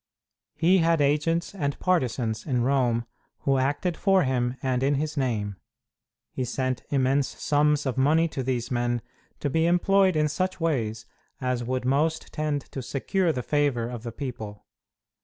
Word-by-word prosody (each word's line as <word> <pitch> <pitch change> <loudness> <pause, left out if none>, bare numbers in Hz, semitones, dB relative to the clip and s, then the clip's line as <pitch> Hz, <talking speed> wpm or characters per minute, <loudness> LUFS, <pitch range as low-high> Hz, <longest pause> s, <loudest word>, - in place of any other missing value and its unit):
He 180 +3 +4
had 165 -1 +3
agents 150 +5 +1
and 145 -7 -2
partisans 125 -10 0
in 125 -4 +1
Rome 120 -3 +1 0.4
who 135 -1 +2
acted 145 +6 0
for 195 0 +3
him 125 -1 0
and 130 -1 0
in 140 +2 +2
his 150 +2 -2
name. 110 -8 -1 0.7
He 130 - -3
sent 130 0 -2
immense 135 0 +2
sums 150 0 +2
of 130 -1 -1
money 160 +5 +4
to 135 - -4
these 125 -2 -2
men, 120 -1 0 0.4
to - - 0
be 160 +4 +2
employed 190 +1 +3
in 150 0 +3
such 185 +5 -2
ways 115 -10 -1 0.3
as 125 -2 -1
would 125 +1 -2
most 150 +5 0
tend 150 -2 -1
to 135 - -4
secure 165 +8 0
the 125 -5 -3
favor 140 -6 +1
of 120 -2 -6
the 115 0 -6
people. 110 -5 -7
135 Hz, 160 wpm, -26 LUFS, 125-155 Hz, 0.7 s, He